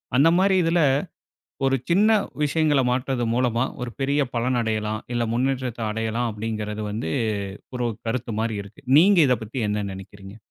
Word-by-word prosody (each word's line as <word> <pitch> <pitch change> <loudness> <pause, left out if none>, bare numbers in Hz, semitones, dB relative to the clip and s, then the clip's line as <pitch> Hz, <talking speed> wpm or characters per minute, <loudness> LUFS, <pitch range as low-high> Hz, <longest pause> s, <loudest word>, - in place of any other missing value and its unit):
அந்த 145 +5 +6
மாரி 190 +1 +3
இதில 165 +1 +2 0.9
ஒரு 135 0 +3
சின்ன 200 +6 +4 0.3
விஷயங்களை 150 -2 +2
மாற்றுது 125 0 -1
மூலமா 120 0 +1 0.2
ஒரு 125 - -3
பெரிய 140 +2 +1
பலன் 120 +1 +1
அடையலாம் 110 -1 -1
இல்லை 120 -1 0
முன்னேற்றத்தை 125 -1 -1
அடையலாம் 115 +2 -1
அப்படின்கிறது 105 0 -4
வந்து 105 -6 -3 0.6
ஒரு 125 -1 -1 0.2
கருத்து 120 +1 -2
மாரி 110 -1 -1
இருக்கு. 100 +8 -15 0.2
நீங்க 190 +3 +6
இதை 125 - +3
பத்தி 120 +4 -5
என்ன 105 0 -1
நினைக்கிறீங்க? 95 +1 -11
120 Hz, 150 wpm, -24 LUFS, 110-135 Hz, 0.9 s, அந்த